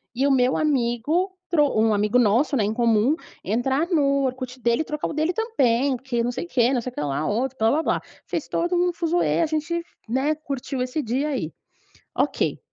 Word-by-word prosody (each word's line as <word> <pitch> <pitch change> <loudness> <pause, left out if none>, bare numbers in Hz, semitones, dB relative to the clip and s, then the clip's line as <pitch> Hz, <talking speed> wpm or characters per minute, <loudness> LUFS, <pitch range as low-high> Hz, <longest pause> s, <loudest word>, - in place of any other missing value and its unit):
e 265 +3 +1
o - - +3
meu 255 -1 +3
amigo, 300 - 0
trou 295 -8 +2
um 220 -1 +3
amigo 210 +4 +2
nosso, 245 +6 +3
né, 220 - +2
em 210 - -1
comum, 230 +3 +3 0.3
entrar 265 - 0
no 280 -5 +2
Orkut 255 0 -4
dele 235 +2 +1
e - - -3
trocar 300 -1 -3
o - - -5
dele 310 +3 +1
também, 275 - +1
porque 245 -1 -2
não 240 - 0
sei 245 - -4
o - - -13
quê, 250 -5 +2
não 250 - +1
sei 255 - -5
o - - -24
quê - - -3
lá, 145 +1 -1
outro 255 +5 -1
blá-blá-blá. 250 +9 +1 0.2
Fez - - -3
todo 345 +1 0
um 355 0 +2
fuzuê, 340 0 +1
a - - +3
gente, 320 +2 -2 0.3
né, 270 +6 +1
curtiu 275 -3 -4
esse 255 +5 -1
dia 265 +5 -1
aí. 230 - -2 0.7
Ok. - - 0
265 Hz, 205 wpm, -24 LUFS, 235-310 Hz, 0.7 s, o